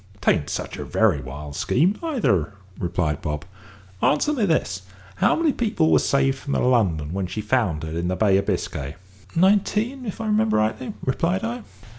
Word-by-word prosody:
"'Tain't 80 -6 +2
such - - -4
a - - -4
very 95 -11 +2
wild 70 +3 -8
scheme 170 - +2
neither," 120 - 0 0.2
replied 85 -4 -1
Bob. 75 +3 -3 0.6
"Answer 295 - +2
me 230 -8 +1
this. 95 - 0 0.4
How - - +3
many 320 -3 +2
people 210 -9 +1
was - - +4
saved 135 -1 +2
from 140 - -4
the - - +1
London 90 -12 +1
when 95 -1 -2
she 95 +5 -5
foundered 100 -9 0
in 85 +1 -2
the 90 - 0
Bay 100 -1 +3
of 100 - -1
Biscay?" 70 +2 -2 0.4
"Nineteen, 210 +7 +2
if 205 - -5
I 225 - -3
remember 215 +1 +2
rightly," 110 +4 -1
replied 170 +8 0
I. 240 +1 -3
120 Hz, 175 wpm, -23 LUFS, -, 0.6 s, was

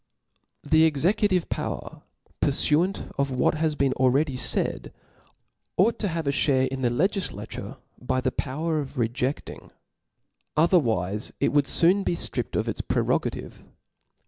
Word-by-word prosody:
The 160 +2 +4
executive 180 +4 +2
power, - - -5 0.4
purfuant 155 +6 +1
to 140 - +3
what 125 - +2
has 155 -1 0
been 140 -2 +1
already 130 +2 +2
faid, 125 - 0 0.9
ought 215 +6 +3
to 210 - 0
have 165 -3 -3
a 140 - +2
ihare 135 -2 +2
in 135 0 -5
the 125 - +2
legiilature 130 - -3 0.2
by 125 +1 0
the 130 0 0
power 155 +6 -2
of 145 0 -6
rejeAing, 125 +3 -3 0.9
otherwife 115 - +2
it - - +2
would 145 -2 +3
foon 180 +8 +4
fee - - 0
ftrippcd - - -2
of - - 0
its - - -2
prerogative. - - -2
145 Hz, 135 wpm, -25 LUFS, 130-165 Hz, 0.9 s, The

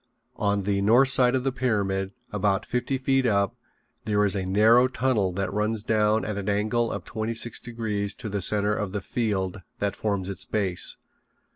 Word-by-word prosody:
On 100 -1 0
the 100 0 0
north 120 +6 +5
side 130 -1 +4
of 130 - 0
the 135 - 0
pyramid, 100 -6 -1 0.2
about 100 -1 0
fifty 125 +2 -1
feet 135 0 +1
up, 100 +2 +1 0.5
there 105 -1 +2
is 100 - +4
a 95 -2 -2
narrow 110 +6 +5
tunnel 125 -6 0
that 100 +1 -3
runs 105 +1 -1
down 110 0 +2
at 105 -1 -3
an 100 +1 -3
angle 110 +3 0
of - - -5
twenty 110 +1 -3
six 115 +1 -1
degrees 110 -4 -3
to 125 - -6
the 100 -1 -3
center 105 +2 +2
of 105 -3 -3
the 105 - -2
field 100 -3 -2 0.2
that 100 -1 -2
forms 100 -3 -2
its 100 - -5
base. 95 -4 -1
105 Hz, 185 wpm, -25 LUFS, 100-120 Hz, 0.5 s, north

